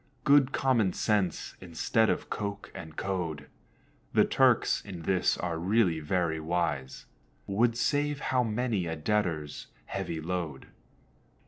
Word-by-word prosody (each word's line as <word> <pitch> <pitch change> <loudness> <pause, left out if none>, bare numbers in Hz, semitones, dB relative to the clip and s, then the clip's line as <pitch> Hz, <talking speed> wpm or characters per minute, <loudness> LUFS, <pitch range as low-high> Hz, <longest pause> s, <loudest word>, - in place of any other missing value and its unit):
Good 140 -1 +5
common 120 -11 +2
sense, 105 -5 0
instead 95 +5 +1
of - - -1
Coke 100 -1 -4
and 80 -2 -9
code, 85 -6 -3 0.7
(The - - +5
Turks - - +3
in 90 -5 -8
this 95 +1 +2
are 85 -2 -2
really 90 -2 +2
very 80 0 0
wise,) 80 -5 -2 0.4
Would 115 +4 +1
save 145 +2 +1
how 125 -1 +4
many 110 -5 -1
a 80 - -2
debtor's 80 -4 -1 0.2
heavy 80 - -4
load. 80 -4 -4
95 Hz, 125 wpm, -29 LUFS, 80-110 Hz, 0.7 s, Good